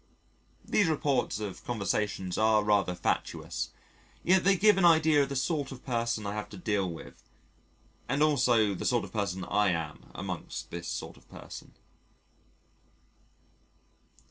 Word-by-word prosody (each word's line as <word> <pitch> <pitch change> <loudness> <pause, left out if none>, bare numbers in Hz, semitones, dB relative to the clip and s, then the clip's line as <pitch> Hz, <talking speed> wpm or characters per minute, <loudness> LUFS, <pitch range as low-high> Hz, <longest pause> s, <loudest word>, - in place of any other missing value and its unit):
(These 205 - +2
reports 140 -8 0
of 105 -3 -6
conversations 100 -4 -2
are 110 -1 +3
rather 100 -3 +2
fatuous: 90 - -2 0.5
yet 185 +1 +4
they 195 0 +4
give 210 +1 +5
an - - +2
idea 160 -3 +5
of 140 - 0
the 140 - -4
sort 145 +1 -1
of 130 -2 -10
person 115 -3 -1
I 100 - -2
have 105 0 -5
to 100 - -10
deal 100 -1 0
with, 80 - -11 0.9
and 140 +3 +2
also 120 -8 +3
the - - -5
sort 120 -2 +2
of - - -9
person 100 -4 -2
I 105 +1 +2
am 80 -3 -4
among - - -5 0.2
this 85 0 -6
sort - - -5
of - - -22
person.) - - -11
110 Hz, 145 wpm, -29 LUFS, 100-145 Hz, 0.9 s, give